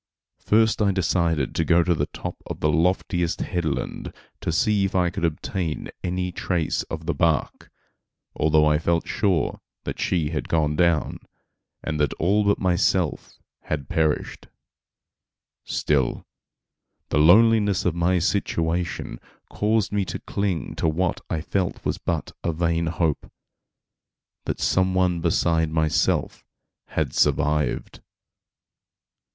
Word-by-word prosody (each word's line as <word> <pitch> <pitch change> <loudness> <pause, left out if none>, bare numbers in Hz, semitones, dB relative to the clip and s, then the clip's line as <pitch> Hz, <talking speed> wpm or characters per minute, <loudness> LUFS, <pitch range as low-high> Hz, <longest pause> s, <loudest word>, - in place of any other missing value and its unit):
First 110 +1 +2
I 100 -2 +3
decided 85 -6 0
to 80 - 0
go 85 +1 +4
to 85 - +2
the 80 - -1
top - - -6
of - - -6
the 75 - +2
loftiest 90 +1 0
headland 85 -6 -3 0.3
to - - -2
see 100 +5 +2
if 95 - -2
I 90 -2 +2
could 90 - -5
obtain 85 +1 -2
any 90 0 -2
trace 85 -2 -1
of 80 0 -5
the 85 - 0
bark, 80 -4 0 0.7
although 75 0 +3
I 75 0 +3
felt 85 0 0
sure 95 -8 0 0.2
that - - -5
she 80 -4 0
had 80 - -3
gone 75 -2 +1
down, 85 -1 +1 0.6
and 75 -1 -3
that 75 - +1
all 100 +5 +2
but 100 0 +2
myself 90 0 0 0.3
had 70 -3 -3
perished; 80 -3 -1 1.2
still, 70 -5 0 0.8
the 75 - +1
loneliness 105 +4 +5
of 90 - +2
my 85 +2 +1
situation 85 -2 -1 0.3
caused 105 0 +1
me 105 -1 +1
to - - -4
cling 100 -5 -3
to 80 - +1
what 85 +3 -1
I 80 - -1
felt 90 +2 -2
was - - -1
but - - -3
a 85 - 0
vain 85 0 0
hope, 80 -3 -1 1.1
that - - -3
some 95 0 +1
one 90 -2 +2
beside 80 -1 +1
myself 80 -1 0 0.4
had - - -2
survived. 75 -3 0
85 Hz, 135 wpm, -24 LUFS, 80-95 Hz, 1.2 s, loneliness